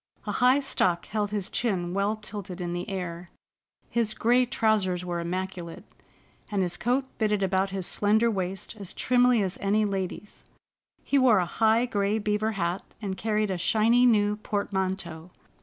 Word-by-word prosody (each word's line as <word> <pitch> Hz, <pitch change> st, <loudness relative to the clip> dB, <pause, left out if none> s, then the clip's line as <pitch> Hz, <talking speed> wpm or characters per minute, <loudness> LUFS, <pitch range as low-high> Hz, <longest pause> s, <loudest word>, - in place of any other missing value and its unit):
A -, -, -2 dB
high 255 Hz, +2 st, +4 dB
stock 180 Hz, -10 st, 0 dB
held 210 Hz, -1 st, -2 dB
his 205 Hz, -3 st, -2 dB
chin 180 Hz, -7 st, -1 dB
well 200 Hz, +2 st, +1 dB
tilted 205 Hz, -3 st, -7 dB
in 175 Hz, -1 st, -3 dB
the 175 Hz, 0 st, -4 dB
air, 180 Hz, -2 st, -5 dB, 0.6 s
his 225 Hz, -2 st, -1 dB
gray 245 Hz, +2 st, +3 dB
trousers 205 Hz, -6 st, +1 dB
were 175 Hz, -1 st, -2 dB
immaculate, 180 Hz, 0 st, -4 dB, 0.7 s
and 200 Hz, -3 st, 0 dB
his 175 Hz, -1 st, -1 dB
coat 250 Hz, +6 st, 0 dB
fitted 210 Hz, -2 st, +1 dB
about 190 Hz, +1 st, +1 dB
his 190 Hz, -2 st, -3 dB
slender 220 Hz, +5 st, +2 dB
waist 190 Hz, +1 st, -4 dB
as 195 Hz, -3 st, -7 dB
trimly 245 Hz, -3 st, +3 dB
as 185 Hz, -1 st, -4 dB
any 210 Hz, +2 st, +2 dB
lady's. 195 Hz, +1 st, -5 dB, 0.6 s
He 280 Hz, -, +2 dB
wore 250 Hz, -5 st, +5 dB
a 180 Hz, -, +2 dB
high 225 Hz, +6 st, +2 dB
gray 205 Hz, -3 st, 0 dB
beaver 215 Hz, +1 st, 0 dB
hat 175 Hz, -1 st, -1 dB, 0.2 s
and 200 Hz, -3 st, -4 dB
carried 215 Hz, 0 st, 0 dB
a 185 Hz, -, -2 dB
shiny 230 Hz, +6 st, +4 dB
new 210 Hz, -2 st, +3 dB
portmanteau. 190 Hz, -5 st, -3 dB
205 Hz, 160 wpm, -27 LUFS, 185-220 Hz, 0.7 s, wore